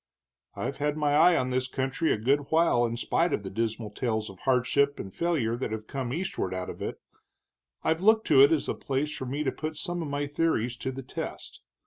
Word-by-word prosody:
"I've 135 +3 -3
had 150 +1 -1
my 150 -1 +1
eye 165 +3 +6
on 130 0 0
this 130 0 0
country 135 +4 -1
a - - +2
good 140 +6 +1
while 160 -7 +3
in 115 +1 -4
spite 165 +8 +1
of 105 - -1
the 95 - -6
dismal 110 0 -2
tales 110 -2 -2
of 95 - -16
hardship 135 +2 +2
and 95 - -7
failure 155 -10 0
that 120 -2 -3
have 110 -1 -4
come 130 0 -4
eastward 165 - -2
out 90 0 -4
of - - -12
it. - - -4 0.8
I've 160 +1 +1
looked 220 +2 +4
to 140 -4 +7
it 140 +3 +7
as 160 - +2
the - - -1
place 145 +3 -2
for 130 - -5
me 140 +4 -2
to 135 - 0
put 155 0 -5
some 175 +2 -3
of 160 - -3
my 145 0 -2
theories 145 -5 0
to 130 - -3
the 135 +1 -7
test. 125 - -7
135 Hz, 230 wpm, -28 LUFS, 120-155 Hz, 0.8 s, to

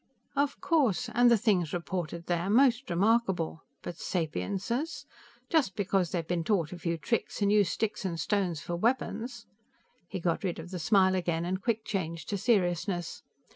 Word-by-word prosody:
"Of 285 0 0
course, 275 - +2
and 245 +1 +5
the 235 - +6
things 195 -8 +1
reported 170 -1 -4
were 175 +2 0
most 250 +2 +4
remarkable. 190 -4 +1 0.2
But 175 - -6
sapiences! 200 - -2 0.4
Just 280 - +2
because 195 -3 +1
they've 165 -2 -2
been 175 -1 0
taught 175 -5 0
a 175 - -8
few 170 -1 -1
tricks, 230 +8 -2
and 200 - +3
use 205 -4 +4
sticks 210 +3 -2
and 170 -4 -3
stones 180 -3 0
for 175 - -4
weapons 235 +3 -1 0.3
" 245 -8 -39
He 190 - -4
got 170 +1 -1
rid 180 -3 -1
of 165 +2 -8
the 180 - -4
smile 190 +1 +4
again, 170 -2 0
and 185 +2 -2
quick 220 0 -1
changed 170 -6 -3
to 200 - -1
seriousness. 180 -5 0
190 Hz, 175 wpm, -29 LUFS, 170-225 Hz, 0.4 s, the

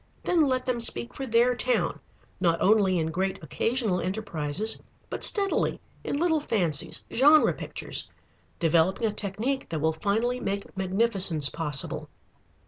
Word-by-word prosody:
Then 345 -2 +2
let 255 -1 0
them 250 -2 -1
speak 120 - -3
for 270 - -5
their 235 +2 +3
town, 250 0 0 0.4
not 170 -3 +2
only 195 -3 +3
in 160 -1 -1
great 190 +3 -1
occasional 220 - -1
enterprises, 185 0 -2 0.3
but - - -3
steadily, 395 -2 +2 0.2
in - - -2
little 320 0 +2
fancies, 175 - -1
genre 295 +5 +5
pictures, - - -3 0.5
developing 170 +6 +2
a 220 - +1
technique 215 +7 -2
that 165 -2 -3
will 160 +2 +1
finally 220 +9 -1
make 200 -4 -4
magnificence 190 -5 +1
possible. 150 -4 -1
200 Hz, 135 wpm, -27 LUFS, 170-245 Hz, 0.5 s, genre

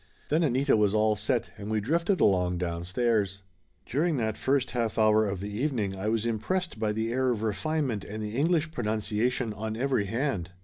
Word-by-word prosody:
Then 155 +3 +2
Anita 135 -3 +3
was 105 -1 +2
all 110 0 +3
set 115 +3 -1
and 100 +1 -6
we 110 0 +1
drifted 170 - +1
along 90 -2 +3
downstairs. 95 +4 -1 0.4
During 155 +4 0
that 110 -3 -1
first 135 -1 0
half 115 -3 -1
hour 110 -1 +4
of 100 -2 -3
the 100 +1 -5
evening 110 -5 -1
I 95 +2 -4
was 110 0 0
impressed 120 - -2
by 110 -1 +1
the 110 +2 -2
air 130 0 +1
of 115 -3 -1
refinement 125 0 -1
and 110 +1 -5
the 105 +1 -5
English 160 +3 +1
pronunciation 110 0 -1
on 110 +1 -4
every 130 -5 0
hand. 115 - -1
110 Hz, 185 wpm, -28 LUFS, 105-130 Hz, 0.4 s, hour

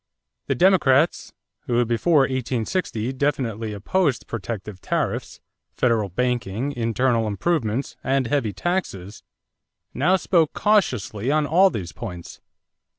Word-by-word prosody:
The 135 - 0
Democrats, 165 -3 +3 0.4
who 120 0 +2
before 140 +7 +3
1860 130 - -2
definitely 120 -6 -1
opposed 135 - 0
protective 105 -3 -6
tariffs, - - -2 0.4
federal 115 -5 +1
banking, 120 +4 -1
internal 115 -2 0
improvements, 120 - -1
and 135 -1 +1
heavy 120 -4 0
taxes, 100 - -3 0.7
now 175 +7 +3
spoke 170 -4 +2
cautiously 125 - +1
on 150 +1 +2
all 185 +6 +5
these 90 - -5
points. 90 -7 -8
125 Hz, 105 wpm, -23 LUFS, 110-150 Hz, 0.7 s, all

